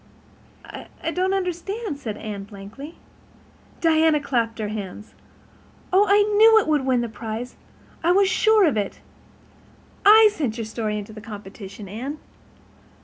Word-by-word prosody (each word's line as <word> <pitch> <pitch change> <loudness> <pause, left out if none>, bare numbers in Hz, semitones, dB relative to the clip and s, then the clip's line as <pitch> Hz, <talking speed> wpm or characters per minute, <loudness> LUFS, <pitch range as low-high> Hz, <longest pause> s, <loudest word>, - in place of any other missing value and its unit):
"I 330 - -7
don't 370 +2 0
understand," 370 -1 -3
said 215 -6 -5
Anne, 205 -3 -6
blankly. 210 +10 -11 0.9
Diana 320 -2 +3
clapped 235 -5 -1
her 215 -2 -3
hands. 210 0 -7 0.8
"Oh, 400 +3 +5
I 410 +1 +5
knew 445 +1 +7
it 440 - +3
would 300 -3 +1
win 255 -2 +2
the 235 - -2
prize—I 235 +9 -6
was 390 +2 +4
sure 420 +2 +4
of 290 -9 +1
it. 205 -2 -3 1.0
I 430 +1 +8
sent 260 - -3
your 225 - -4
story 215 -1 -3
into 210 +1 -7
the 215 - -10
competition, 205 -1 -10
Anne." 250 +10 -6
260 Hz, 140 wpm, -23 LUFS, -, 1.0 s, I